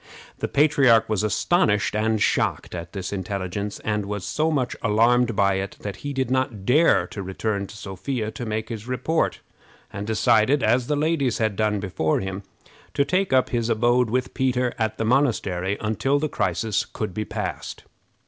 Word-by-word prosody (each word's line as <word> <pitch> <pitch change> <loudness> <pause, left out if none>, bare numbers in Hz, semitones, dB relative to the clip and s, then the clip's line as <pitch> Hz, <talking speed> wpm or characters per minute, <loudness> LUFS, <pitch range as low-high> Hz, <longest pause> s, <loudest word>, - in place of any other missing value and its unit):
The - - -1
patriarch 135 -6 +4
was 110 -2 +1
astonished 110 - +1
and 110 0 +1
shocked - - 0
at 85 -1 -6
this 95 -1 -4
intelligence, 100 +1 -4
and 105 -2 -2
was 105 -2 -4
so 155 +1 0
much 135 -6 -1
alarmed 115 +2 +3
by 100 -1 +3
it 100 +1 -5
that 100 -1 -5
he 145 - -5
did 130 -3 -2
not 130 -7 -1
dare 130 - +4
to 100 - -7
return 100 +1 -3
to 110 - -11
Sophia 110 +4 -4
to 120 - -7
make 110 -1 -3
his 115 -1 -6
report, 150 +6 -1 0.5
and 100 +1 -5
decided, 110 +4 +3
as 125 0 +2
the 150 - +1
ladies 145 -5 +1
had 110 -3 0
done 105 0 +1
before 90 -5 0
him, 95 0 -4 0.5
to 140 - +3
take 185 +3 0
up 130 -1 +3
his 120 -1 -1
abode 120 +1 +2
with 125 +3 -1
Peter 125 -2 +1
in 110 -1 +1
the 115 - -1
monastery 100 -7 +1
until 110 +6 0
the 155 +2 0
crisis 110 -6 -1
should 105 -4 -3
be 110 - -2
passed. - - -5
110 Hz, 175 wpm, -24 LUFS, 100-130 Hz, 0.5 s, patriarch